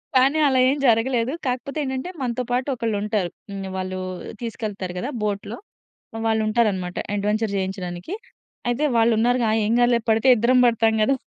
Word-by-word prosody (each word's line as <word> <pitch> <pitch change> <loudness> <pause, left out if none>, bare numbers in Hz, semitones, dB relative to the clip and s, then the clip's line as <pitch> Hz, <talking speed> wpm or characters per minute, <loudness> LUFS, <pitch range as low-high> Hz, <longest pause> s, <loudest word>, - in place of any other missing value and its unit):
కానీ 270 +4 +4
అలా 260 -2 +3
ఏం 280 - +1
జరగలేదు. 235 +2 +2 0.2
కాకపోతే 255 +4 -3
ఏంటంటే, 265 +5 -3
మనతో 250 0 -1
పాటు 250 +2 0
ఒకళ్లుంటారు. 210 -4 -1 0.2
హ్మ్. 195 -1 -5
వాళ్లు 185 0 -3 0.4
తీసుకెళ్తారు 210 -6 -4
కదా 255 - -3
బోట్‌లో, 205 +2 -3 0.7
వాళ్లుంటారన్నమాట 215 -5 +1 0.2
అడ్వెంచర్ 210 +1 0
చేయించడానికి. 190 - -4 0.6
అయితే, 250 +5 0
వాళ్లున్నారుగా, 230 +1 +3
ఆ! - - +3
ఏం 220 - +1
గాదులే. 240 -1 +4
పడితే 225 +4 +3
ఇద్దరం 250 +3 +4
పడతాం 225 -1 +2
కదా! 270 +4 +2
225 Hz, 140 wpm, -23 LUFS, 205-250 Hz, 0.7 s, కానీ